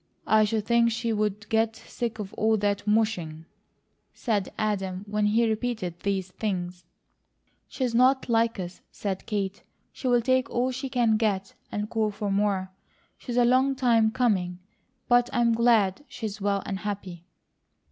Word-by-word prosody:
"I 215 0 +4
should 210 0 -1
think 235 0 +4
she 230 0 -1
would 210 -1 -1
get 225 0 +1
sick 235 -1 -5
of 205 -2 -6
all 220 0 +2
that 205 0 -1
mushing," 185 -8 0 0.7
said 210 -5 -1
Adam 195 -3 -2
when 210 0 +1
he 225 +2 +3
repeated 215 -6 -2
these 190 -2 -2
things. 180 -3 -4 0.8
"She's 255 -3 -2
not 260 +3 +4
like 230 -2 +2
us," 180 0 -6
said 195 -2 -4
Kate. 200 -2 -2 0.3
"She'll 245 -2 +2
take 260 0 +2
all 250 +2 0
she 260 +1 -4
can 235 -4 +2
get, 200 -3 -1 0.2
and 210 0 -2
call 220 -1 0
for 205 0 -3
more. 195 -2 0 0.5
She's 245 -2 -4
a 245 - +5
long 260 +3 +3
time 235 -4 +3
coming; 200 -7 0 0.5
but 245 0 +4
I'm 235 -3 +2
glad 225 -1 +3
she's 215 -4 -6
well 200 -1 0
and 195 -1 -3
happy." 195 -5 -5
215 Hz, 155 wpm, -26 LUFS, 195-235 Hz, 0.8 s, a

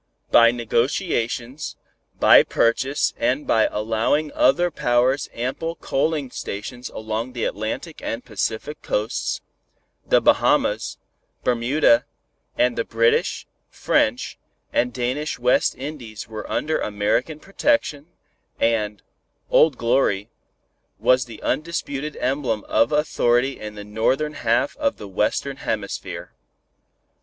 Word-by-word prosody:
By 115 0 +7
negotiations, 120 - -1 0.4
by - - +8
purchase 130 +5 +1
and 130 +5 +1
by 110 - +3
allowing 115 +8 0
other 175 0 +3
powers 125 0 +1
ample 135 +8 -3
coaling 145 -3 -1
stations 120 +5 -6
along 110 +3 -4
the 120 -2 -3
Atlantic 110 - -4
and 115 +2 -4
Pacific 115 +6 -3
coasts, 105 +2 -2 0.6
the - - +4
Bahamas, - - +2 0.5
Bermuda 120 0 +3 0.5
and 125 -1 +2
the - - +2
British, 115 +1 +1 0.2
French - - 0 0.3
and 125 +1 +2
Danish 130 +5 -2
West 125 +1 +2
Indies 125 -8 -7
were 110 -1 -7
under 155 +1 0
American 110 +9 -1
protection, 195 - 0 0.5
and 105 -2 0 0.5
"Old 155 -5 +5
Glory" 115 -3 +1 0.7
was 125 -1 +3
the 115 -3 -11
undisputed 150 -2 -2
emblem 130 -5 -1
of 115 - +2
authority 135 -3 +1
in 105 0 -7
the 105 - -7
northern 130 +8 0
half 115 +1 +1
of 285 -2 0
the 105 - -8
Western 105 +8 -1
Hemisphere. 105 -6 -4
125 Hz, 110 wpm, -22 LUFS, 115-145 Hz, 0.7 s, by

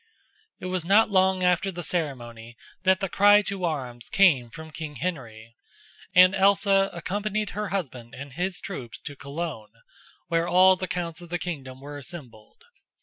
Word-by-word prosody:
It - - -8
was 185 -2 -2
not 205 +5 +4
long 190 -1 +3
after 180 +2 +2
the 175 -1 -6
ceremony 120 -9 -4 0.2
that 190 0 +2
the 195 - 0
cry 205 +2 +5
to 195 -2 -2
arms 125 -7 -4
came 150 -12 +4
from 160 +5 -10
King 155 -1 -7
Henry, 115 -9 -6 0.6
and 185 +1 +8
Elsa 195 0 +3
accompanied 205 +4 -3
her 210 -1 -4
husband 130 -11 -5
and 140 0 -9
his 180 +2 -2
troops 125 -12 -7
to 145 - -8
Cologne, 140 -7 -6 0.5
where 165 0 0
all 185 +1 +6
the 185 0 -4
counts 170 -1 -4
of 175 - -12
the 175 - -1
kingdom 135 -7 -6
were 145 +1 -8
assembled. 140 - -11
175 Hz, 160 wpm, -25 LUFS, 135-190 Hz, 0.6 s, and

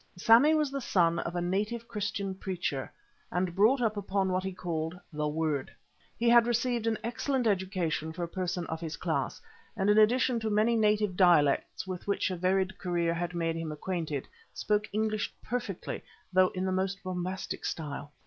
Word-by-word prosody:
Sammy 235 - +6
was 300 -3 +1
the 275 0 -3
son 170 -6 +2
of 170 +1 -4
a 175 - 0
native 210 +6 -1
Christian 205 -2 -3
preacher, 180 -8 -3 0.4
and 180 0 -1
brought 220 +8 +4
up 215 -2 +1
upon 195 -1 0
what 185 0 0
he 190 - -2
called 170 -1 -4
"The 150 0 -1
Word." 150 -3 -1 0.5
He 235 - 0
had 235 0 +6
received 240 -1 0
an 225 -1 +1
excellent 245 +2 -1
education 185 -6 0
for 175 +2 -5
a - - -2
person 180 -1 -3
of 160 +1 -5
his 160 -2 -4
class, 160 -6 -2 0.4
and 200 0 +3
in 210 - +5
addition 245 +2 +4
to 220 -1 -2
many 215 +3 +3
native 210 -3 +2
dialects 170 -7 +3
with 185 0 -6
which 200 -1 0
a - - -2
varied 185 +2 0
career 175 -2 0
had 175 +1 -3
made 165 -1 0
him 165 -1 -4
acquainted, 155 -3 -3 0.3
spoke 210 0 0
English 215 0 -1
perfectly, 225 -6 -4 0.3
though 185 0 +6
in 185 +1 -1
the 190 - 0
most 190 +1 -1
bombastic 185 0 -4
style. 145 -2 -4
190 Hz, 180 wpm, -30 LUFS, 170-215 Hz, 0.5 s, Sammy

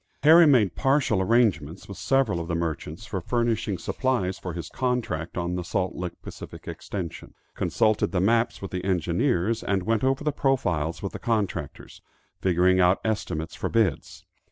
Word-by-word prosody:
Harry 160 +2 +8
made 110 - +4
partial 135 - +2
arrangements 95 -7 +1
with 100 - -8
several 120 -3 +1
of 85 - -5
the 85 - -1
merchants 85 +3 -4
for 95 -3 -4
furnishing 115 -1 0
supplies 95 -2 -1
for 90 - -5
his 85 0 -5
contract 120 -12 -2
on 85 0 -1
the 90 0 -2
Salt 90 +1 -1
Lick 90 -1 -6
Pacific - - -10
Extension; 90 -5 -6 0.2
consulted 110 -1 +1
the 95 - 0
maps 115 +3 +1
with 95 - -5
the 90 -1 -3
engineers, 95 - 0
and 95 -2 0
went 115 +3 0
over 135 +2 +1
the 150 - +1
profiles 95 - 0
with 100 - -4
the - - -6
contractors, 100 - -3 0.4
figuring 95 0 +3
out 90 +1 +4
estimates 90 -7 -2
for - - -3
bids. 105 - -1
95 Hz, 165 wpm, -25 LUFS, 90-115 Hz, 0.4 s, Harry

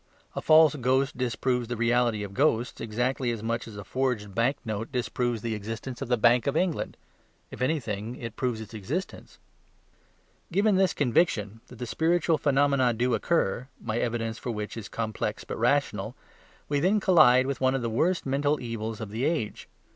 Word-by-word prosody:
A - - -2
false 155 -1 +6
ghost 135 +2 +1
disproves 125 0 -1
the 120 0 -4
reality 120 -2 +2
of 100 -1 -7
ghosts 125 -2 +1
exactly 120 +3 -1
as 115 -2 -3
much 115 +1 -2
as 105 -2 -9
a 100 - -6
forged 115 -3 -2
banknote 115 -1 -1
disproves 120 -2 -1
the 115 -1 -1
existence 115 +4 -6
of - - -3
the 125 0 +2
Bank 120 +2 +4
of 140 +2 +1
England 180 -3 -1 0.5
if - - -9
anything, 120 -5 -2
it 115 -3 -7
proves 125 -4 -1
its 110 -1 -10
existence. 125 - -5 1.1
Given 200 +3 +3
this 190 -2 +2
conviction 115 - +1
that 125 - -13
the 125 - -4
spiritual 165 +4 +1
phenomena 140 -4 +2
do 125 +2 +1
occur 125 - 0
(my 115 0 -2
evidence 115 -2 -2
for - - -5
which 105 -2 -4
is 110 -3 -7
complex 110 -2 -3
but - - -6
rational), - - +1 0.5
we 145 -1 0
then 190 +7 +3
collide 155 -10 +6
with 135 0 -3
one 130 0 +3
of 130 - -2
the - - 0
worst 165 +11 0
mental 145 +2 +1
evils 115 -2 -5
of 105 -2 -6
the 115 +4 -3
age. 150 -9 -2
125 Hz, 175 wpm, -27 LUFS, 115-140 Hz, 1.1 s, false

